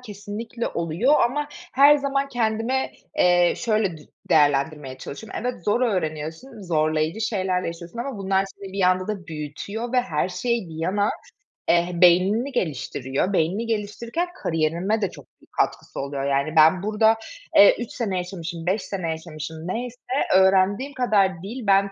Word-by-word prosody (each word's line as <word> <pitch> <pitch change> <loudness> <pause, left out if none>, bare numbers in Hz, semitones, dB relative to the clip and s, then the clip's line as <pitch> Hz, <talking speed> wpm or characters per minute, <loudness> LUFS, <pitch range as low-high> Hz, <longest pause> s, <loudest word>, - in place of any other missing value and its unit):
kesinlikle 220 +1 -5
oluyor 170 - +1
ama 290 +5 +1
her 295 -3 +4
zaman 275 0 -1
kendime, 235 +1 -1 0.3
eee, 175 -1 +4
şöyle 215 -7 0
dü 150 - -14 0.3
değerlendirmeye 145 -2 +2
çalışıyorum. 215 +12 -7
Evet, 245 -8 -4
zor 210 +4 +2
öğreniyorsun, 170 - -3
zorlayıcı 155 +2 0
şeyler 185 -4 0
yaşıyorsun 170 +5 -7
ama 250 -2 -4
bunlar 195 0 +1
seni 195 0 -11
bir 195 - -1
anda 185 +1 +2
da 200 -4 -4
büyütüyor 165 - -5
ve 250 - +4
her 170 -7 -1
şey 230 +2 -1
bir 160 - -10
yana, 200 +4 +1 0.6
eh, 175 +1 +2
beynini 185 +9 +4
geliştiriyor. 145 - -2
Beynini 185 +7 +1
geliştirirken 230 - -2 0.2
kariyerime 170 +7 0
de 200 - +1
çok - - -13 0.2
büyük - - -24
katkısı - - -2
oluyor 140 0 -3
yani. 140 +3 0
Ben 160 +4 +6
burada, 220 +1 +3 0.4
eee, 200 - +8
3 240 - -5
sene 205 -7 -2
yaşamışım, 175 -2 -5
5 190 +3 +1
sene 185 -4 -4
yaşamışım 160 -1 -6
neyse 245 +5 -4 0.4
öğrendiğim 195 +8 +3
kadar 210 -7 +2
dil, 225 +2 -6
ben 195 0 +4
195 Hz, 150 wpm, -23 LUFS, 165-230 Hz, 0.6 s, eee